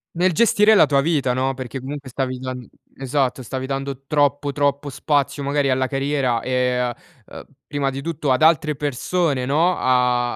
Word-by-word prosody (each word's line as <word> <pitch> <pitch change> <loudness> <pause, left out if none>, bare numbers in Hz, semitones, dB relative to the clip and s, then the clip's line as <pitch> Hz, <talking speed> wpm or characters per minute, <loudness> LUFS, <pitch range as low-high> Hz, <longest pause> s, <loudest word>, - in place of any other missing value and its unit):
Nel 180 +2 +2
gestire 215 +3 +4
la - - +6
tua 140 -1 +2
vita, 145 -5 +1
no, 130 +1 0
perché 130 0 -6
comunque 135 +1 -7
stavi 130 0 -3
dan 130 -2 -6 0.3
esatto, 135 -1 -1
stavi 130 +2 -5
dando 135 0 -5
troppo, 145 -1 +1
troppo 145 0 -1
spazio 140 +1 -1
magari 140 0 0
alla 130 0 +1
carriera, 135 -3 -1
ehm, 125 -1 0
a 120 -1 -2 0.4
ehm, - - -10 0.2
prima 140 -2 -1
di 135 +1 -5
tutto 155 -3 -2
ad 130 - +1
altre 155 -1 +3
persone 145 0 -1
no, 165 +7 +2
a 125 -1 +1
135 Hz, 175 wpm, -21 LUFS, 130-145 Hz, 0.4 s, la